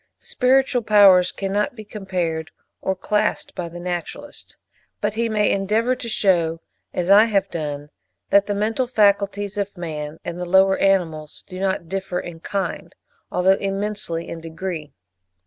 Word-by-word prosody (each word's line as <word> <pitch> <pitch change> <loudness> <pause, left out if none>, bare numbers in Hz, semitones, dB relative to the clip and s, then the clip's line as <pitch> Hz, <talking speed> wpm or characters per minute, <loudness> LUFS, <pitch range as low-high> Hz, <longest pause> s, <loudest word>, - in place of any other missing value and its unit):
Spiritual 265 - +2
powers 195 -4 +6
cannot 205 +4 -2
be 215 -2 -9
compared 180 -6 -3 0.3
or 190 - -1
classed 210 +3 -1
by 175 -3 -5
the 175 +1 -9
naturalist: 175 -1 -6 0.4
but 210 0 -1
he 230 +1 0
may 210 -1 +2
endeavour 215 +6 +1
to 235 - -6
shew, 170 -6 +2 0.3
as 180 +2 -1
I 210 +2 +8
have 200 -3 0
done, 145 -2 -4 0.4
that 200 0 +5
the 205 - -1
mental 225 +5 0
faculties 205 -2 +1
of 200 -1 -3
man 155 -3 -5
and 175 +1 -5
the 180 - -3
lower 190 +2 +4
animals 165 -6 0
do 185 -1 -8
not 190 -3 -1
differ 190 0 -3
in 170 -1 -8
kind, 195 +3 -4 0.4
although 190 +2 +3
immensely 195 -4 -3
in 165 - -7
degree. 165 -2 -5
195 Hz, 150 wpm, -22 LUFS, 175-210 Hz, 0.4 s, I